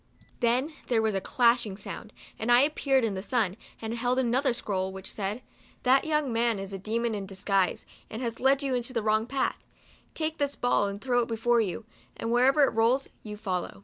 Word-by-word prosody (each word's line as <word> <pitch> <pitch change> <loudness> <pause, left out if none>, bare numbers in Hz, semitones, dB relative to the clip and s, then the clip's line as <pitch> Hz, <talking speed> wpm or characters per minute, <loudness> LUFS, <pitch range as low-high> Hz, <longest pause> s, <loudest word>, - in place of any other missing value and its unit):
Then 250 +6 +1
there 235 -3 +2
was 220 -1 +1
a 195 - -1
clashing 235 -4 +2
sound, 215 +1 -8 0.3
and 230 +2 0
I 240 +1 +7
appeared 275 -3 +2
in 220 -3 0
the 190 - -4
sun, 215 -4 0 0.2
and 225 0 -4
held 245 +2 0
another 260 +2 +2
scroll, 190 -5 -2
which 190 0 -8
said, 210 +4 -4 0.2
" - - -30
That 265 +3 +4
young 300 -5 0
man 230 -1 +2
is 195 0 -6
a 195 - -5
demon 220 -1 -2
disguised, 195 -1 0 0.2
and 220 - -6
has 230 -2 -3
led 270 +2 +3
you 270 -2 -1
into 245 0 -2
the 230 -3 -1
wrong 215 +1 +2
path. 270 +1 -1 0.5
Take 315 0 -2
this 285 -1 0
ball 245 -4 +2
and 200 0 -5
throw 245 +1 +1
it 230 - -2
before 235 +1 +2
you, 215 +2 -3 0.3
and 230 - -3
wher 245 +1 +4
ever 275 +2 +5
it - - +4
rolls, 235 +4 +2
you 210 -1 -8
follow." 185 - -3
235 Hz, 210 wpm, -28 LUFS, 210-255 Hz, 0.5 s, I